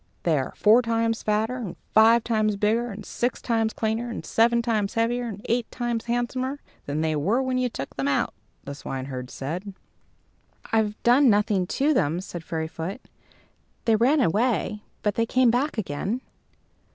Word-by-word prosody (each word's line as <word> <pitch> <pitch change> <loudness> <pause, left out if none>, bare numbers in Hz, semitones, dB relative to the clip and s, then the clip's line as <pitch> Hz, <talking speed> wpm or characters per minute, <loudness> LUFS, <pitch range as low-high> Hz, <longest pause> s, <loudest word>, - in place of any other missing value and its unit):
"They 165 -2 +2
are 130 - -4
four 220 +4 +5
times 230 -1 0
fatter, 220 +4 0
and 220 -9 -5 0.2
five 225 +2 +6
times 215 -2 +1
bigger, 220 +4 +1
and 205 -1 -8
six 245 +1 -2
times 225 -2 0
cleaner, 225 +2 -2
and 230 - -6
seven 235 +1 +3
times 215 -4 0
heavier, 240 +2 0
and 210 +1 -8
eight 235 0 0
times 240 -2 -3
handsomer 255 +3 -2 0.3
than 145 +2 -1
they 160 -1 0
were 190 - +1
when 260 -1 0
you 250 -1 +1
took 135 - -7
them 135 0 -1
out," 140 - +1 0.3
the 140 - -6
swineherd 130 -2 -6
said. 180 +8 -5 1.0
"I've 215 -2 +1
done 250 +3 +6
nothing 205 -3 +2
to 290 +9 +1
them," 165 - +1
said 175 -3 -7
Fairyfoot. 160 +5 -4 0.9
"They 225 - +4
ran 265 +7 +3
away, 215 +1 +1 0.2
but 210 - +1
they 230 +2 0
came 255 -1 +4
back 255 +3 0
again." 200 - -2
220 Hz, 165 wpm, -25 LUFS, 190-240 Hz, 1.0 s, five